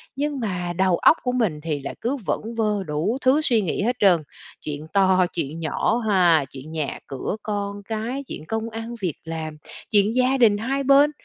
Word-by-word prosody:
nhưng 285 0 -2
mà 180 -6 -2
đầu 185 -2 +3
óc 320 - +5
của 250 - 0
mình 215 -12 0
thì 150 -2 -3
lại 135 - -6
cứ 260 +5 -1
vẩn - - -1 0.2
vơ 210 -3 +1
đủ 165 - -1
thứ 265 +4 +4
suy 235 -7 +2
nghĩ 190 +1 -1
hết 245 +3 +1
trơn. 180 -6 +4 0.4
Chuyện 150 +1 -6
to, 190 -2 +4
chuyện 160 -1 -3
nhỏ 165 +8 0
ha, 175 -7 +4
chuyện 140 +3 -10
nhà 155 -3 -3
cửa 135 +7 -3
con 205 -1 -3
cái, 225 +6 -3
chuyện 155 - -7
công 225 +1 -2
ăn 225 +1 -6
việc 175 -6 -1
làm, 160 -1 -5 0.3
chuyện 210 +1 +3
gia 255 +1 +3
đình 220 -5 +5
hai 270 +6 -1
bên, 280 +2 +5
205 Hz, 195 wpm, -23 LUFS, 165-235 Hz, 0.4 s, óc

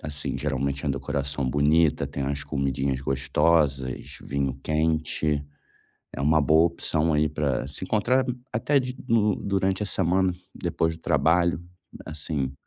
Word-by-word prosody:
assim, 75 -1 -4
geralmente 70 -1 -2
é - - 0
uma - - +1
decoração 70 0 -2
bonita, 75 +3 +3
tem 70 - -4
umas 70 +1 -2
comidinhas 70 -2 -1
gostosas, 70 0 0
vinho 70 -1 -2
quente, 80 -1 0 0.7
é - - -6
uma 75 +2 +4
boa 80 +4 +5
opção 80 -1 0
aí 75 +1 +2
pra 70 -4 -1
se 70 +6 -6
encontrar 120 +6 +2 0.3
até 130 +6 +2
de 125 0 -5
no 105 -3 +3
durante 95 0 0
a - - -4
semana, 95 0 +1 0.3
depois 80 0 0
do - - -19
trabalho, 85 +2 +2 0.4
assim. 75 -3 -3
75 Hz, 140 wpm, -25 LUFS, 70-85 Hz, 0.7 s, boa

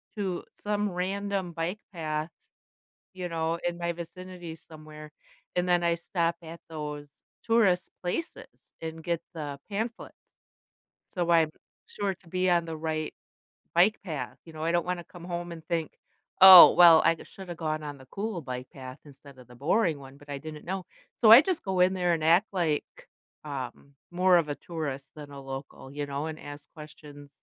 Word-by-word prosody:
to 190 -4 -3
some 210 0 -2
random 190 +1 -2
bike 170 +5 -3
path, 155 -3 -3 0.8
you 185 -1 -5
know, 165 0 -1
in 175 0 -3
my 170 0 -1
vicinity 175 0 -8
somewhere, 155 -1 -12 0.5
and 180 0 +1
then 175 -1 +3
I 170 0 +2
stop 170 0 -1
at 165 0 -10
those 150 -2 -6 0.3
tourist 210 -6 +3
places 185 - -6
and 160 0 -6
get 170 0 -1
the 145 -3 -6
pamphlets. 220 +3 -6 0.7
So, 175 -2 -3
I'm 165 -2 +4 0.4
sure 200 -1 -2
to 185 -1 -23
be 185 +1 +1
on 170 -1 +3
the 165 -1 -5
right 155 -1 -3 0.6
bike 190 +6 +4
path. 145 - -5
You 165 - -13
know, 155 0 -6
I 165 - +1
don't 175 0 +1
wanna 180 -1 -3
come 175 0 -13
home 175 -1 -4
and 165 -2 -9
think, 165 -3 -2 0.4
"Oh, 190 -2 +12
well, 170 -2 +8
I 165 - +5
g - - -12
shoulda 190 -3 -9
gone 155 -2 -3
on 145 -1 -6
the 130 - -15
cool 200 - -4
bike 125 -2 -6
path 130 0 -10
instead 140 -1 -15
of 125 -1 -15
the 125 - -15
boring 160 - +1
one, 135 0 -13
but 145 0 -18
I 140 - -3
didn't 155 +1 -9
know," 190 0 -4 0.3
so 220 -3 +6
I 235 +4 +12
just 360 +1 -2
go 190 -2 -1
in 185 +1 +4
there 180 -2 +1
and 160 -2 -2
act 175 +6 +4
like, 165 -5 -2 0.3
um, 140 -1 -7 0.2
more 180 0 +4
of 160 -3 +1
a 145 - -2
tourist 145 -4 -6
than 150 -2 -10
a 140 -1 -9
local, 135 0 -8
you 145 0 -3
know, 140 +2 -4
and 160 0 -6
ask 145 0 -10
questions 150 -2 -12
165 Hz, 185 wpm, -28 LUFS, 150-180 Hz, 0.8 s, Oh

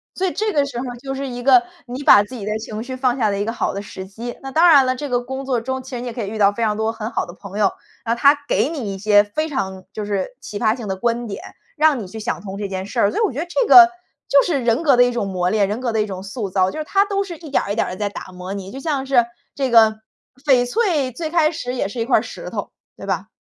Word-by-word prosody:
所 380 - -1
以 365 - 0
这 430 0 -1
个 290 -6 +2
时 260 -4 -5
候 260 - -4
就 270 +1 -5
是 275 +1 -4
一 245 -1 -6
个 360 +7 +6 0.2
你 250 +2 -6
把 205 -6 +7
自 250 - -12
己 215 - -7
的 210 - -3
情 220 0 -6
绪 260 +2 -6
放 255 -1 +1
下 215 - +2
的 200 -1 -2
一 205 - -1
个 230 - -2
好 - - -1
的 200 - -4
时 190 - -8
机。 235 +5 -7
那 270 - -6
当 330 +5 +5
然 285 -5 +7
了， 255 0 0
这 285 +1 -5
个 245 0 +1
工 265 +2 -6
作 250 -4 0
中 260 +1 -4
其 265 - -12
实 245 -2 -4
你 245 - -5
也 235 - -5
可 230 -2 -4
以 - - -4
遇 215 +2 -5
到 200 -1 +5
非 230 +3 -3
常 215 -1 +1
多 220 +1 0
很 225 0 -6
好 - - -1
的 175 - -9
朋 200 +1 -8
友。 200 - +3 0.3
那 230 0 0
他 280 +4 +5
给 - - +2
你 230 -12 -4
一 - - -7
些 205 0 +5
非 310 +10 -3
常 190 -10 -4
就 210 -1 -4
是 205 - -3
启 205 - -7
发 220 0 +2
性 235 -4 -7
的 190 - -2
观 235 +4 -1
点， 200 - -7 0.3
让 305 -4 +3
你 195 - -6
去 220 +4 -8
想 220 - -3
通 195 -1 -7
这 205 -1 -3
件 190 -1 -4
事 - - -4
儿。 200 - +3
所 - - -2
以 - - +2
我 400 - +1
觉 255 - -9
得 330 - -2
这 460 +6 0
个 355 -1 +9 0.4
就 280 - +5
是 305 -6 0
人 235 +5 +2
格 280 -6 +4
的 245 - +7
一 245 - +2
种 235 -4 -2
磨 180 -1 -1
炼， 205 -2 +2
人 210 - -2
格 245 - -1
的 220 - +2
一 210 - -1
种 190 -1 -6
塑 200 0 -5
造。 185 0 +1
就 - - -6
是 310 - -2
它 395 +5 +2
都 400 -1 -1
是 345 -4 -8
一 310 -3 -11
点 - - +2
儿 200 - -4
一 - - -1
点 - - +1
儿 - - -5
地 185 - -6
在 205 -1 -1
打 185 - -9
磨 180 +2 -7
你， 195 -1 -7
就 270 - -7
像 280 -3 -2
是 255 -3 +4 0.3
这 270 -2 -1
个 220 -2 +5 0.4
翡 260 -4 +4
翠 315 - +1
最 315 +6 -5
开 320 -2 +3
始 255 -6 -4
也 220 - -1
是 230 +4 -7
一 230 - 0
块 260 - +4
儿 - - +1
石 - - -8
头， - - -5 0.3
对 - - -9
吧？ - - -2
240 Hz, 345 characters per minute, -20 LUFS, 205-275 Hz, 0.4 s, 个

